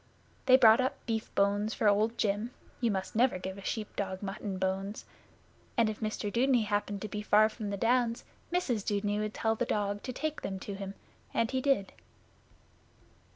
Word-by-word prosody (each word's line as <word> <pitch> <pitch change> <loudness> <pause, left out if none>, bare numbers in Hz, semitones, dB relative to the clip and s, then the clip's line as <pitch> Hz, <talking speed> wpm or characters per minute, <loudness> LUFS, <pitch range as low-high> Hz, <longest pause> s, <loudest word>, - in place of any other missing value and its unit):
They 255 0 +9
brought 230 -1 +7
up 260 +2 0
beef 220 -1 -2
bones 205 +2 +2
for 215 - +1
Old 215 +3 +3
Jim 210 +2 0 0.3
(you 235 - +2
must 190 -1 -3
never 245 -2 +3
give 190 +2 -6
a - - -10
sheep 215 0 -4
dog 190 -1 -3
mutton 200 0 -4
bones), 190 +2 -2 0.7
and 225 -2 +4
if 215 - -9
Mr 215 -1 -3
Dudeney 245 -1 +3
happened 205 -1 -1
to - - -2
be 210 +1 -4
far 215 +1 +4
in 210 -2 -3
the 200 - -2
Downs, 235 +2 +2 0.3
Mrs 255 - 0
Dudeney 205 0 0
would 215 0 -3
tell 220 -1 +1
the 225 - -1
dog 205 0 -1
to 255 - -5
take 310 +4 -3
them 190 - -3
to 200 - -5
him, 195 0 -6 0.4
and 230 -1 +1
he 260 -1 0
did. 265 -8 +1
215 Hz, 190 wpm, -31 LUFS, 200-230 Hz, 0.7 s, They